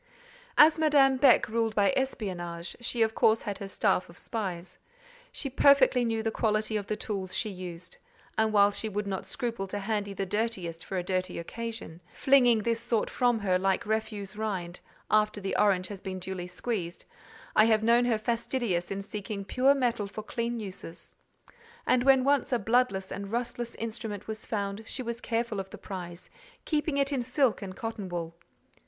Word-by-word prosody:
As 310 Hz, +1 st, +7 dB
Madame 280 Hz, -4 st, +5 dB
Beck 275 Hz, +1 st, +5 dB
ruled 225 Hz, 0 st, 0 dB
by 205 Hz, +5 st, +3 dB
espionage, 180 Hz, -10 st, -3 dB
she 235 Hz, -1 st, +1 dB
of 220 Hz, 0 st, 0 dB
course 220 Hz, 0 st, +3 dB
had 205 Hz, -2 st, -4 dB
her 200 Hz, -, -5 dB
staff 195 Hz, -2 st, +1 dB
of 170 Hz, -, -14 dB
spies: 185 Hz, -6 st, -5 dB, 0.5 s
she 280 Hz, -, -3 dB
perfectly 270 Hz, -2 st, +5 dB
knew 225 Hz, -1 st, 0 dB
the 225 Hz, -, 0 dB
quality 215 Hz, 0 st, 0 dB
of 205 Hz, -2 st, -2 dB
the 215 Hz, -, -1 dB
tools 195 Hz, -3 st, -3 dB
she 215 Hz, -, -1 dB
used, 180 Hz, -1 st, -8 dB, 0.4 s
and 220 Hz, 0 st, +2 dB
while 205 Hz, -1 st, +5 dB
she 220 Hz, +2 st, -1 dB
would 210 Hz, 0 st, -2 dB
not 195 Hz, -2 st, -4 dB
scruple 230 Hz, -5 st, -3 dB
to 200 Hz, -, -4 dB
handle 205 Hz, -1 st, -2 dB
the 195 Hz, -, -2 dB
dirtiest 190 Hz, -5 st, -2 dB
for 190 Hz, -, -4 dB
a 180 Hz, -, -1 dB
dirty 185 Hz, 0 st, -2 dB
occasion—flinging 230 Hz, +4 st, +1 dB
this 230 Hz, 0 st, +1 dB
sort 235 Hz, -2 st, 0 dB
from 245 Hz, -2 st, +2 dB
her 190 Hz, -4 st, +1 dB
like 195 Hz, 0 st, +1 dB
refuse 215 Hz, -2 st, -2 dB
rind, 190 Hz, -5 st, -3 dB, 0.3 s
after 215 Hz, -1 st, +3 dB
the 195 Hz, -1 st, -3 dB
orange 190 Hz, -3 st, +3 dB
has 195 Hz, -1 st, -8 dB
been 190 Hz, -1 st, -5 dB
duly 185 Hz, -1 st, -5 dB
squeezed—I 185 Hz, +1 st, -2 dB
have 220 Hz, -1 st, +3 dB
known 235 Hz, +2 st, +4 dB
her 235 Hz, -2 st, +2 dB
fastidious 230 Hz, -5 st, -1 dB
in 195 Hz, 0 st, -3 dB
seeking 200 Hz, 0 st, -5 dB
pure 265 Hz, +6 st, +3 dB
metal 235 Hz, -6 st, 0 dB
for 210 Hz, +2 st, -7 dB
clean 235 Hz, +1 st, -3 dB
uses; 185 Hz, -5 st, -6 dB, 0.7 s
and 250 Hz, -1 st, +3 dB
when 265 Hz, -1 st, +5 dB
once 280 Hz, -1 st, +2 dB
a 245 Hz, -, +3 dB
bloodless 225 Hz, -3 st, +1 dB
and 200 Hz, 0 st, -5 dB
rustless 240 Hz, 0 st, -3 dB
instrument 220 Hz, -3 st, -5 dB
was 220 Hz, 0 st, -6 dB
found, 200 Hz, -1 st, -2 dB
she 255 Hz, -, -3 dB
was 235 Hz, 0 st, -4 dB
careful 230 Hz, -3 st, -1 dB
of 190 Hz, 0 st, -5 dB
the -, -, -9 dB
prize, 175 Hz, -3 st, -8 dB, 0.3 s
keeping 300 Hz, -2 st, 0 dB
it 275 Hz, 0 st, +2 dB
in 265 Hz, -, 0 dB
silk 255 Hz, 0 st, +1 dB
and 190 Hz, -2 st, -7 dB
cotton 225 Hz, -4 st, -5 dB
wool. 170 Hz, -2 st, -4 dB
215 Hz, 180 wpm, -29 LUFS, 190-235 Hz, 0.7 s, As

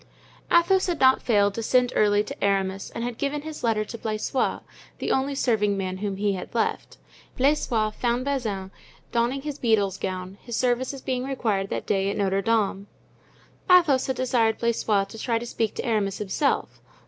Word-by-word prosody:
Athos 370 Hz, +3 st, +4 dB
had 345 Hz, -4 st, -1 dB
not 260 Hz, 0 st, +5 dB
failed 205 Hz, -4 st, +2 dB
to 230 Hz, -, -4 dB
send 250 Hz, +2 st, +2 dB
early 205 Hz, 0 st, +3 dB
to -, -, -7 dB
Aramis 195 Hz, -1 st, 0 dB
and 230 Hz, -, -3 dB
had 240 Hz, -1 st, -4 dB
given 290 Hz, +1 st, -2 dB
his 310 Hz, -1 st, -7 dB
letter 220 Hz, -2 st, +1 dB
to 230 Hz, -, -8 dB
Blaisois, 215 Hz, +4 st, -1 dB, 0.4 s
the -, -, -2 dB
only 275 Hz, +1 st, 0 dB
serving 210 Hz, -6 st, +1 dB
man 185 Hz, -1 st, -3 dB
whom 200 Hz, 0 st, -3 dB
he 205 Hz, 0 st, +1 dB
had 190 Hz, +5 st, -7 dB
left. 230 Hz, -, -1 dB, 0.4 s
Blaisois 250 Hz, -6 st, +2 dB
found 240 Hz, +3 st, -1 dB
Bazin 215 Hz, -9 st, -2 dB, 0.4 s
donning 245 Hz, +3 st, 0 dB
his 295 Hz, -1 st, -5 dB
beadle's 205 Hz, -5 st, +2 dB
gown, 185 Hz, 0 st, -5 dB
his 235 Hz, -2 st, -6 dB
services 255 Hz, +2 st, 0 dB
being 255 Hz, -1 st, -1 dB
required 220 Hz, -8 st, -1 dB
that -, -, -3 dB
day 195 Hz, -1 st, +1 dB
at 200 Hz, -, -3 dB
Notre 195 Hz, -1 st, +1 dB
Dame. 205 Hz, -2 st, 0 dB, 0.8 s
Athos 330 Hz, -8 st, +5 dB
had 265 Hz, -, -1 dB
desired 240 Hz, -3 st, +1 dB
Blaisois 225 Hz, -3 st, +1 dB
to 225 Hz, +3 st, -10 dB
try 230 Hz, 0 st, 0 dB
to 235 Hz, -, -5 dB
speak 225 Hz, -2 st, -2 dB
to -, -, -4 dB
Aramis 210 Hz, -4 st, 0 dB
himself. 210 Hz, +8 st, -1 dB
225 Hz, 180 wpm, -25 LUFS, 200-260 Hz, 0.8 s, not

